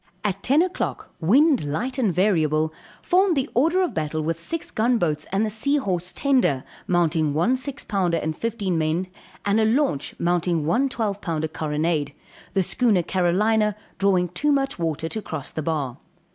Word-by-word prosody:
At 195 Hz, -1 st, -1 dB
10 290 Hz, +6 st, +3 dB
o'clock, 365 Hz, 0 st, -4 dB
wind 265 Hz, -, +4 dB
light 240 Hz, -, -2 dB
and 220 Hz, -7 st, +2 dB
variable, 160 Hz, -4 st, +2 dB, 0.3 s
formed 365 Hz, -2 st, +3 dB
the 270 Hz, +1 st, +1 dB
order 330 Hz, +9 st, +3 dB
of 360 Hz, -, -2 dB
battle 155 Hz, 0 st, -2 dB
with 165 Hz, +1 st, -2 dB
six 330 Hz, -, -5 dB
gun 235 Hz, +3 st, +2 dB
boats 155 Hz, -6 st, -1 dB
and 200 Hz, +3 st, +1 dB
the 215 Hz, -, -2 dB
Sea 280 Hz, +7 st, +1 dB
Horse 180 Hz, -8 st, -1 dB
tender, 250 Hz, -, +2 dB, 0.2 s
mounting 160 Hz, -4 st, +1 dB
one 200 Hz, +12 st, +3 dB
six 275 Hz, +2 st, -4 dB
pounder 180 Hz, -5 st, 0 dB
and 155 Hz, 0 st, -2 dB
fifteen 205 Hz, -6 st, -2 dB
men, 160 Hz, +4 st, 0 dB, 0.4 s
and 205 Hz, +2 st, +2 dB
a 220 Hz, -, +3 dB
launch 225 Hz, -, 0 dB
mounting 170 Hz, -2 st, 0 dB
one 245 Hz, -, +2 dB
twelve 210 Hz, -5 st, -2 dB
pound 160 Hz, -3 st, -2 dB
carronade; 150 Hz, -1 st, -1 dB, 0.4 s
the 195 Hz, -, +2 dB
schooner 210 Hz, -2 st, +2 dB
Carolina, 210 Hz, +4 st, +2 dB, 0.2 s
drawing 185 Hz, -3 st, +2 dB
too 290 Hz, -, 0 dB
much 275 Hz, -6 st, 0 dB
water 160 Hz, -1 st, -1 dB
to 220 Hz, +6 st, -4 dB
cross 155 Hz, -8 st, -6 dB
the 155 Hz, -, -4 dB
bar. 145 Hz, -5 st, -2 dB
185 Hz, 175 wpm, -23 LUFS, 160-245 Hz, 0.4 s, wind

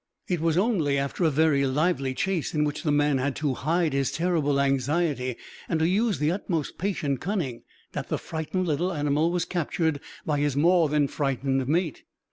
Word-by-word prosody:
It 175 Hz, -2 st, 0 dB
was 165 Hz, 0 st, +1 dB
only 180 Hz, -9 st, +2 dB
after 140 Hz, +6 st, -2 dB
a 165 Hz, -, +5 dB
very 150 Hz, -1 st, +3 dB
lively 140 Hz, -1 st, 0 dB
chase, 185 Hz, -2 st, -1 dB
in 150 Hz, -, +2 dB
which 150 Hz, -1 st, -2 dB
the 155 Hz, -, 0 dB
man 145 Hz, -2 st, +2 dB
had 135 Hz, +1 st, -1 dB
to 145 Hz, -3 st, 0 dB
hide 160 Hz, +4 st, 0 dB
his 135 Hz, -1 st, +1 dB
terrible 160 Hz, -5 st, +1 dB
anxiety 135 Hz, -1 st, 0 dB, 0.3 s
and 165 Hz, -, +1 dB
to 160 Hz, -, +3 dB
use 210 Hz, +3 st, +1 dB
the 150 Hz, +2 st, +1 dB
utmost 170 Hz, -5 st, -3 dB
patient 150 Hz, -8 st, -1 dB
cunning, 160 Hz, -, -2 dB, 0.3 s
that -, -, -5 dB
the -, -, 0 dB
frightened 160 Hz, +3 st, -3 dB
little 170 Hz, +4 st, 0 dB
animal 150 Hz, 0 st, +1 dB
was 175 Hz, 0 st, 0 dB
captured 165 Hz, -3 st, -1 dB, 0.3 s
by 150 Hz, -2 st, 0 dB
his 145 Hz, -2 st, 0 dB
more 165 Hz, +2 st, +4 dB
than 150 Hz, -1 st, +2 dB
frightened 135 Hz, -2 st, -1 dB
mate. 160 Hz, 0 st, 0 dB
150 Hz, 185 wpm, -26 LUFS, 140-175 Hz, 0.3 s, a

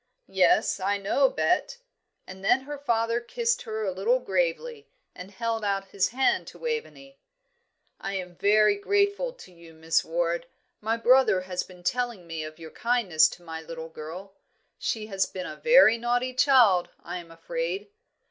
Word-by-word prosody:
"Yes, 185 Hz, +1 st, +3 dB
I 200 Hz, +2 st, 0 dB
know, 200 Hz, -, +2 dB
Bet;" -, -, 0 dB, 0.5 s
and 190 Hz, +1 st, -11 dB
then 245 Hz, +6 st, +3 dB
her 290 Hz, +1 st, -7 dB
father 230 Hz, -3 st, 0 dB
kissed 470 Hz, -, -1 dB
her 220 Hz, 0 st, -4 dB
a 190 Hz, -, -1 dB
little 200 Hz, +7 st, +1 dB
gravely, 245 Hz, -, -2 dB, 0.2 s
and 180 Hz, +1 st, -10 dB
held 225 Hz, +2 st, -3 dB
out 195 Hz, -1 st, -1 dB
his 195 Hz, -, +1 dB
hand 270 Hz, +10 st, +1 dB
to -, -, -11 dB
Waveney. 455 Hz, -, -5 dB, 0.8 s
"I 195 Hz, 0 st, -4 dB
am 180 Hz, -2 st, -5 dB
very 210 Hz, +2 st, +4 dB
grateful 405 Hz, -, +1 dB
to -, -, -15 dB
you, 170 Hz, -2 st, -16 dB
Miss 160 Hz, +1 st, +1 dB
Ward. 170 Hz, +1 st, -1 dB, 0.3 s
My 220 Hz, +2 st, -1 dB
brother 240 Hz, -5 st, +4 dB
has 185 Hz, -1 st, -3 dB
been 180 Hz, -1 st, -13 dB
telling 240 Hz, -3 st, -2 dB
me 165 Hz, -2 st, -5 dB
of 155 Hz, 0 st, -9 dB
your 160 Hz, -1 st, -10 dB
kindness 210 Hz, -10 st, +2 dB
to 175 Hz, -, -12 dB
my 160 Hz, -1 st, -7 dB
little 160 Hz, 0 st, -8 dB
girl; 165 Hz, +5 st, -9 dB, 0.5 s
she 220 Hz, -2 st, -2 dB
has 195 Hz, -3 st, -1 dB
been 185 Hz, -1 st, -6 dB
a -, -, -6 dB
very 475 Hz, -, +6 dB
naughty 245 Hz, +2 st, 0 dB
child, 245 Hz, -9 st, +4 dB
I 175 Hz, +1 st, -5 dB
am 170 Hz, -1 st, -12 dB
afraid." 420 Hz, -, -4 dB
205 Hz, 165 wpm, -26 LUFS, 180-255 Hz, 0.8 s, very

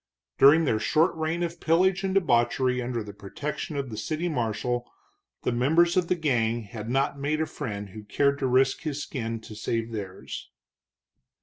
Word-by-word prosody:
During 155 Hz, +4 st, +7 dB
their 110 Hz, -6 st, +1 dB
short 160 Hz, +9 st, +2 dB
reign 160 Hz, +2 st, -1 dB
of 170 Hz, 0 st, -4 dB
pillage 185 Hz, +4 st, +3 dB
and 190 Hz, 0 st, -1 dB
debauchery 125 Hz, -5 st, +2 dB
under 120 Hz, -2 st, -2 dB
the 105 Hz, -1 st, -9 dB
protection 145 Hz, +9 st, -5 dB
of 135 Hz, -3 st, -3 dB
the 110 Hz, -, -6 dB
city 155 Hz, +10 st, -2 dB
marshal, 120 Hz, -3 st, -2 dB, 0.5 s
the -, -, +1 dB
members 160 Hz, +8 st, +3 dB
of 180 Hz, -2 st, +2 dB
the 180 Hz, -, +2 dB
gang 120 Hz, -8 st, 0 dB
had 110 Hz, +2 st, -7 dB
not 135 Hz, +2 st, 0 dB
made 150 Hz, +2 st, 0 dB
a 160 Hz, -, +1 dB
friend 105 Hz, -10 st, -5 dB
who 110 Hz, +3 st, -9 dB
cared 140 Hz, +6 st, +1 dB
to 135 Hz, -, +1 dB
risk 130 Hz, +1 st, +3 dB
his 150 Hz, -3 st, -3 dB
skin 115 Hz, -4 st, -4 dB
to 110 Hz, -, -10 dB
save 115 Hz, +2 st, -2 dB
theirs. 100 Hz, -4 st, -6 dB
135 Hz, 180 wpm, -27 LUFS, 115-160 Hz, 0.5 s, During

